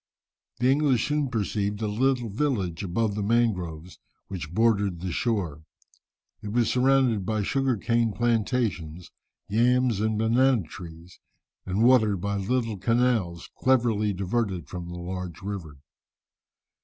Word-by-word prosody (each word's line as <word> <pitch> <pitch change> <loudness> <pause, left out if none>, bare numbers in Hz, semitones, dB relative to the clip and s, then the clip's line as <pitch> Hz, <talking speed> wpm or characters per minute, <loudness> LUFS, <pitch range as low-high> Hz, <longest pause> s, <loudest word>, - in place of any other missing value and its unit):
The 125 +2 +3
English 135 -4 +2
soon 150 -2 0
perceived 105 -3 -2
a 110 - -2
little 120 +1 0
village 100 - -1
above 100 +4 0
the 105 - -3
mangroves 90 -7 -1 0.3
which 90 -5 -6
bordered 100 -3 +2
the 95 -1 -3
shore. 90 -9 -1 0.8
It 105 - -6
was 120 0 +2
surrounded 125 -4 +3
by 110 +2 -1
sugar 135 +2 0
cane 115 +2 +1
plantations, 110 -8 -1 0.4
yams, 120 +1 +2
and 110 0 0
banana 120 +1 +3
trees, 85 +1 -11 0.5
and 95 +4 +1
watered 110 -6 +4
by 100 +3 -2
little 115 +1 -1
canals, 115 -6 0
cleverly 115 -5 +2
diverted 95 - -2
from 85 +2 -7
the 90 0 -7
large 90 -1 -6
river. 95 -8 -6
105 Hz, 130 wpm, -26 LUFS, 90-120 Hz, 0.8 s, watered